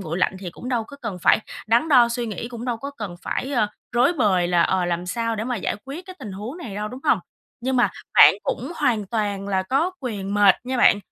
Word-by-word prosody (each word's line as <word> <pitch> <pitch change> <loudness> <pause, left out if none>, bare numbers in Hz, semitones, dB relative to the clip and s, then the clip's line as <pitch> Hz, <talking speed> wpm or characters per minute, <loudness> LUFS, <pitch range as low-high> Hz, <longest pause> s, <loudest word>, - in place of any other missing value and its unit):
nguội 170 -2 -4
lạnh 190 - +1
thì 185 -2 -6
cũng 245 - -9
đâu 240 -3 0
có 280 - -12
cần 210 -6 -4
phải - - +5 0.3
đắn 235 +8 +3
đo 250 -5 +6
suy 235 0 -2
nghĩ, 220 +2 -5
cũng 240 -1 -7
đâu 245 -2 -1
có 275 +5 -6
cần 210 -10 -7
phải, 270 - -3
ơ, 235 -5 +2 0.3
rối 245 +6 +4
bời 200 - +2
là, 175 -1 +4
ờ, 185 -1 +1
làm 175 0 -2
sao 230 +4 -1
để 215 - -3
mà 250 0 -2
giải 195 - -2
quyết 290 +8 -8
cái 370 -1 -10
tình 205 - -7
huống 215 - -7
này 235 - -7
đâu, 210 +1 -3
đúng 255 +4 -9
hông? - - +4 0.4
Nhưng 260 +2 -1
mà 245 - +3 0.2
bạn - - +9
cũng 275 +7 -3
hoàn 235 -8 +1
toàn 200 -2 -2
là 190 -1 +1
có 275 - +1
quyền 205 -6 -4
mệt 205 -2 +6
nha 260 +1 -2
bạn, 240 - +5
230 Hz, 255 wpm, -23 LUFS, 195-255 Hz, 0.4 s, bạn